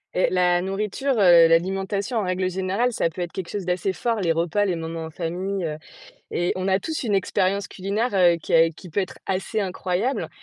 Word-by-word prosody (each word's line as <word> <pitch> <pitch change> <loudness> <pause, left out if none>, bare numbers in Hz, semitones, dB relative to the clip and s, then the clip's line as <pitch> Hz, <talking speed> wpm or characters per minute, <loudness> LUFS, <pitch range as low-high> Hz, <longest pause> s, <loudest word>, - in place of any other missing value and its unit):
Heu, 180 - +3
la 180 -1 +3
nourriture, 210 +8 -1
heu, 175 -4 +7
l'alimentation 195 +7 0
en 215 - +1
règle 185 0 -1
générale, 190 +6 0
ça 165 - +1
peut 180 - -7
être 175 -1 -3
quelque 185 -3 -6
chose 200 -3 -4
d'assez 180 +2 -1
fort, 230 +3 -1
les 170 -3 +2
repas, 170 +5 +1
les 185 -3 0
moments 165 0 -5
en - - -7
famille, 180 +4 -3
heu 155 -1 -3 0.5
et 175 +1 0
on 185 +1 -2
a 190 0 +3
tous 315 +10 -4
une 220 -5 0
expérience 195 0 0
culinaire, 205 +5 -2
heu, 175 -3 +5
qui 165 - -7
est 165 0 +6
qui 180 +3 -13
peut 175 - -1
être 190 - -5
assez 195 +3 -1
incroyable. 190 +5 -2
185 Hz, 215 wpm, -23 LUFS, 175-200 Hz, 0.5 s, heu